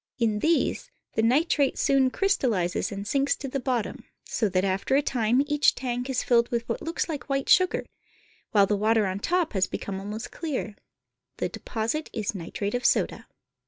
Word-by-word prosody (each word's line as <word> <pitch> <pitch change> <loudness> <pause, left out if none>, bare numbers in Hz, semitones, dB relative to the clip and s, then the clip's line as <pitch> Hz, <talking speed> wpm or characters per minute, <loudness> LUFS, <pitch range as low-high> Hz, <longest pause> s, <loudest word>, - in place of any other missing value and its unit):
In 220 -4 +1
these 335 - +1 0.2
the 220 - +1
nitrate 275 +4 +2
soon 270 -2 +3
crystallizes 240 - 0
and 200 0 -5
sinks 275 +4 +2
to 275 - -6
the 275 +1 -2
bottom, 250 -4 -2 0.2
so 215 - 0
that 185 +1 +1
after 195 +7 0
a 280 - +4
time 245 +1 +2
each 295 0 +3
tank 245 0 -3
is 260 - 0
filled 235 -1 +3
with 235 -1 -2
what 230 - -3
looks 330 +1 -2
like 305 -4 -5
white 275 -1 -1
sugar, 370 0 +4 0.6
while 200 -2 +5
the 205 - +1
water 215 +1 +2
on 190 0 -2
top 350 - 0
has 190 -2 +2
become 195 -1 -5
almost 210 +3 -6
clear. 270 -10 -4 0.6
The - - -1
deposit 230 +7 -3
is 215 -2 -2
nitrate 200 +2 -4
of 245 0 -1
soda. - - +1
240 Hz, 180 wpm, -26 LUFS, 210-275 Hz, 0.6 s, while